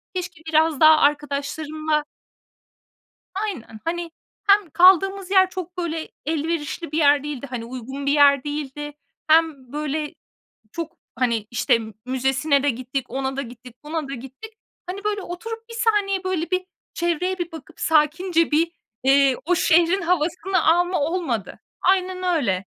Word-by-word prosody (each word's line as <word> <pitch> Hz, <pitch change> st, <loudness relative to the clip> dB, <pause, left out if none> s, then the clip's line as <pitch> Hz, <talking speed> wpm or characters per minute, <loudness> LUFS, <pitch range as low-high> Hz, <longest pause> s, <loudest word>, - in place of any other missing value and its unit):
Keşke 355 Hz, -2 st, -5 dB
biraz 315 Hz, -2 st, +2 dB
daha 310 Hz, 0 st, +8 dB
arkadaşlarımla 300 Hz, +1 st, 0 dB, 1.3 s
Aynen. 375 Hz, -, -5 dB
Hani, 340 Hz, 0 st, -3 dB, 0.4 s
hem 400 Hz, -4 st, +5 dB
kaldığımız 380 Hz, +3 st, +4 dB
yer 380 Hz, -1 st, +5 dB
çok, 365 Hz, -1 st, -7 dB
böyle, 330 Hz, -2 st, -3 dB, 0.2 s
elverişli 320 Hz, 0 st, -2 dB
bir 310 Hz, -, 0 dB
yer 290 Hz, -2 st, +5 dB
değildi, 285 Hz, -2 st, -5 dB
hani, 245 Hz, -3 st, -4 dB
uygun 260 Hz, +3 st, -7 dB
bir 280 Hz, -, +3 dB
yer 280 Hz, -2 st, +5 dB
değildi. 295 Hz, 0 st, -5 dB, 0.3 s
Hem, 310 Hz, -5 st, +2 dB
böyle, 300 Hz, 0 st, -3 dB, 0.6 s
çok, 335 Hz, +3 st, -6 dB, 0.2 s
hani, 230 Hz, -4 st, 0 dB
işte, 235 Hz, 0 st, +2 dB, 0.3 s
müzesine 265 Hz, +3 st, +1 dB
de 290 Hz, -, +3 dB
gittik, 255 Hz, +1 st, -3 dB
ona 265 Hz, 0 st, -3 dB
da -, -, 0 dB
gittik, 245 Hz, -1 st, -11 dB
buna 305 Hz, -1 st, -3 dB
da -, -, -4 dB
gittik. 270 Hz, -, -10 dB, 0.3 s
Hani, 375 Hz, +3 st, -6 dB
böyle, 420 Hz, -1 st, -1 dB
oturup 450 Hz, +6 st, -7 dB
bir -, -, -9 dB
saniye 415 Hz, -5 st, +1 dB
böyle 365 Hz, -3 st, -2 dB
bir 370 Hz, 0 st, 0 dB, 0.3 s
çevreye 345 Hz, +2 st, -1 dB
bir 345 Hz, -1 st, -3 dB
bakıp 320 Hz, -3 st, -12 dB
sakince 325 Hz, +2 st, +2 dB
bir, 330 Hz, +3 st, +2 dB, 0.3 s
eee, 270 Hz, 0 st, +5 dB
o 360 Hz, +2 st, +2 dB
şehrin 345 Hz, +3 st, +3 dB
havasını 360 Hz, +2 st, 0 dB
alma 350 Hz, +2 st, +3 dB
olmadı. 290 Hz, -, -2 dB, 0.2 s
Aynen 370 Hz, -1 st, +1 dB
öyle. 240 Hz, -, 0 dB
315 Hz, 140 wpm, -23 LUFS, 280-360 Hz, 1.3 s, daha